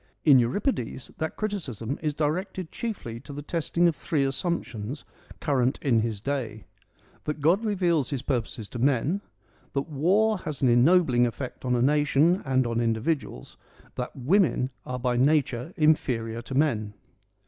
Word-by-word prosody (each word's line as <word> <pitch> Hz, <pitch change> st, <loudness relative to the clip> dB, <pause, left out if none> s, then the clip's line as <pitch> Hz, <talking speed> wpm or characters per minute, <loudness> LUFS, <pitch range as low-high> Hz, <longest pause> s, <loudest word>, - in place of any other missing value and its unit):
In 140 Hz, -4 st, +8 dB
Euripides 125 Hz, -, -1 dB
that 160 Hz, -, -2 dB
criticism 145 Hz, -, -3 dB
is 150 Hz, -2 st, -1 dB
directed 175 Hz, +4 st, -2 dB
chiefly 180 Hz, -, -5 dB
to 145 Hz, -, -11 dB
the 145 Hz, +1 st, -6 dB
testing 170 Hz, +2 st, +1 dB
of 165 Hz, -, +1 dB
three 145 Hz, -2 st, 0 dB
assumptions 135 Hz, -, -3 dB, 0.3 s
current 130 Hz, -3 st, +1 dB
in 120 Hz, -5 st, +2 dB
his 110 Hz, -2 st, -2 dB
day: 115 Hz, -6 st, -3 dB, 0.6 s
that 150 Hz, 0 st, -3 dB
God 170 Hz, +9 st, +3 dB
reveals 175 Hz, -, +1 dB
his 140 Hz, -3 st, -3 dB
purposes 120 Hz, -5 st, -2 dB
to 120 Hz, -, -6 dB
men, 140 Hz, -, +1 dB, 0.5 s
that 140 Hz, +1 st, -1 dB
war 190 Hz, +8 st, +2 dB
has 150 Hz, -6 st, -5 dB
an 130 Hz, -, +5 dB
ennobling 125 Hz, -1 st, +4 dB
effect 125 Hz, +2 st, -6 dB
on 125 Hz, -1 st, +1 dB
a 120 Hz, -, +2 dB
nation 150 Hz, +5 st, +3 dB
and 130 Hz, -1 st, +2 dB
on 115 Hz, 0 st, 0 dB
individuals, 115 Hz, +7 st, -2 dB, 0.4 s
that 125 Hz, -, -5 dB
women 140 Hz, -1 st, +2 dB, 0.2 s
are 125 Hz, -, -3 dB
by 125 Hz, -1 st, 0 dB
nature 135 Hz, 0 st, +2 dB
inferior 120 Hz, -8 st, +1 dB
to 130 Hz, +2 st, -7 dB
men. 110 Hz, -8 st, +1 dB
140 Hz, 150 wpm, -26 LUFS, 120-160 Hz, 0.6 s, In